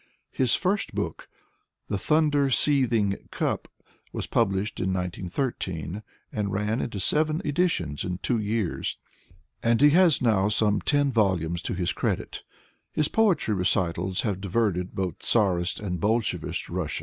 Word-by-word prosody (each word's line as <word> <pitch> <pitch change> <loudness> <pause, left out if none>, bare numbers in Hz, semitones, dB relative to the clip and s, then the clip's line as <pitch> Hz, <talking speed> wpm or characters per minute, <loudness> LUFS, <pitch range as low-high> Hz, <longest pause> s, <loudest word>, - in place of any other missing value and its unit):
His 130 -3 +2
first 200 +2 -1
book, - - -4 0.6
"The 100 - -2
Thunder 150 -1 +2
Seething 120 -8 +3
Cup," - - -2 0.4
was - - -4
pub 100 - +2
lished 95 +1 -2
in 95 - 0
19x3 90 - -3 0.3
and 105 -2 -2
ran 105 +4 -1
into 105 -4 -4
seven 155 - +2
editions 145 - 0
in 90 0 -3
two 115 +4 0
years, 105 -3 -2 0.6
and 115 0 +2
he 145 +2 +6
has 175 -2 +5
now 105 -5 +2
some 105 -1 +2
ten 145 -2 +2
volumes 90 -7 +1
to - - -3
his 90 -1 -1
credit - - -2 0.5
His 150 -1 0
poetry 205 - +2
recitals 90 -1 0
have 100 -4 -2
diverted 95 -2 -1
both 95 -2 -3
Czarist 95 -5 +1
and 90 -4 -3
Bolshevist 110 +4 -1
Russia. - - -3
105 Hz, 140 wpm, -26 LUFS, 95-135 Hz, 0.6 s, he